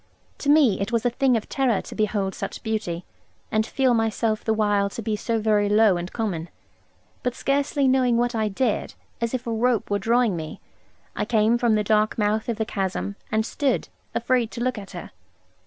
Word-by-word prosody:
To 285 - -2
me 285 -10 +5
it 200 +4 -2
was 230 0 0
a 245 - +3
thing 255 0 +2
of 215 - -5
terror 260 -6 +1
to - - -8
behold 205 -3 0
such - - -6
beauty, 210 -6 -3 0.5
and 215 +1 +1
feel 260 -1 +2
myself 225 -1 0
the 220 - 0
while 205 -2 +2
to 230 - -6
be 215 0 -1
so 230 +2 -1
very 210 -1 +2
low 210 -2 +5
and 175 +1 -4
common. 180 -8 -3 0.7
But 250 -1 -2
scarcely 280 0 +1
knowing 255 -2 +3
what 240 +1 +1
I 220 -2 0
did, 210 +6 -1 0.3
as 235 +2 0
if 250 - -4
a 235 - -2
rope 230 -2 +1
were 205 - +2
drawing 230 0 +2
me, 155 -2 -6 0.6
I - - -1
came 220 0 +3
from 235 -3 +3
the 210 - +1
dark 215 +1 +2
mouth 215 +2 0
of 230 - -1
the 220 - -1
chasm; 195 -1 -3 0.2
and 220 0 +1
stood, 275 +3 -1 0.3
afraid 250 -3 +1
to 235 - -5
look 255 -3 -1
at 195 - -10
her. - - -8
220 Hz, 205 wpm, -24 LUFS, 210-245 Hz, 0.7 s, me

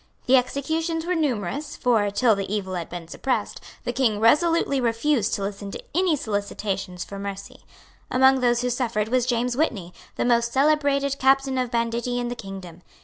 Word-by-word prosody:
The 260 - +5
executions 320 +6 0
were 360 - 0
numerous 285 - -2
for, 225 -5 +2
till 225 +3 +3
the 195 -1 -4
evil 195 -3 -2
had 175 -2 -4
been 175 -2 -7
suppressed, 255 +9 -2 0.2
the 245 - -2
King 235 -5 +1
resolutely 290 +3 +3
refused 235 0 +1
to 200 - -4
listen 200 0 -5
to - - -7
any 355 -1 +2
solicitations 200 - -3
for 200 +3 -8
mercy. 200 0 -7 0.5
Among 265 +1 +5
those 240 -1 +2
who 250 0 0
suffered 230 -4 -1
was 250 0 +1
James 245 0 0
Whitney, 210 - -1 0.2
the - - -1
most 235 -1 +2
celebrated 280 -1 +2
captain 270 0 +3
of 250 -1 -1
banditti 235 +1 -1
in 245 -1 -2
the 245 - -4
kingdom. 190 -5 -9
245 Hz, 175 wpm, -24 LUFS, 205-270 Hz, 0.5 s, The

